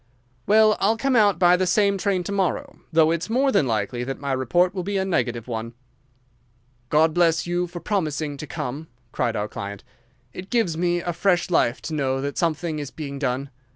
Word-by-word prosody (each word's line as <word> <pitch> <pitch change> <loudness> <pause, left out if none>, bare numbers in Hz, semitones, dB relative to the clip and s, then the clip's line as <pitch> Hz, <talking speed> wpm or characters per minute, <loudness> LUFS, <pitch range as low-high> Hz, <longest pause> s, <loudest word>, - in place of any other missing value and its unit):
"Well, 215 0 +5
I'll 220 +3 +2
come 270 +2 +1
out 205 -5 +4
by 175 0 +5
the 185 +1 0
same 200 +2 +3
train 190 -2 0
to 200 - -5
morrow, 195 -2 -2
though 160 -1 +4
it's 170 +4 -2
more 265 +4 +2
than 140 - +2
likely 115 +2 -1
that 135 +2 -5
my 140 -1 -3
report 135 +8 +2
will 190 - -3
be 200 +2 -2
a 190 - 0
negative 120 - -1
one." 115 0 -5 1.1
"God 155 +1 +3
bless 165 -1 +2
you 175 +1 -1
for 175 0 -8
promising 155 -7 -2
to 150 - -7
come," 140 +5 -5 0.2
cried 120 -3 -1
our 105 0 -1
client. 100 -1 -7 0.5
"It 185 +1 -8
gives 225 -9 +1
me 175 +1 0
fresh 175 +1 0
life 120 -7 +1
to 160 - -5
know 135 -3 0
that 140 +1 -3
something 165 -1 -1
is 145 -2 -5
being 140 -3 -7
done. 135 +1 -2
165 Hz, 195 wpm, -23 LUFS, 135-185 Hz, 1.1 s, Well